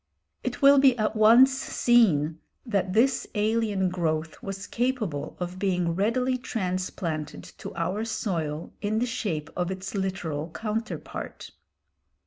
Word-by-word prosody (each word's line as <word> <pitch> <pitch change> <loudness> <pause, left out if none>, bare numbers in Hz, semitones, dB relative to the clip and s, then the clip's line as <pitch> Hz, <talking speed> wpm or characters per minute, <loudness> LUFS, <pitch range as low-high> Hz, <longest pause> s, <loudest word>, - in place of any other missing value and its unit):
It - - -4
will 280 0 +8
be 265 -3 +5
at 215 0 0
once 230 +5 +7
seen 200 - +2 0.3
that 200 -5 0
this 245 +5 +2
alien 210 -3 +1
growth 160 -3 -2
was 195 0 -5
capable 235 - -2
of 180 +1 -4
being 180 -4 +1
readily 250 +7 +1
transplanted 185 - -3 0.2
to - - -6
our 180 +6 -1
soil 170 -9 -3
in 215 +1 0
the 240 - +2
shape 185 -11 -3
of 180 0 -1
its 190 0 -5
literal 180 -6 -3
counterpart. 225 +1 -5
195 Hz, 125 wpm, -26 LUFS, 175-230 Hz, 0.3 s, will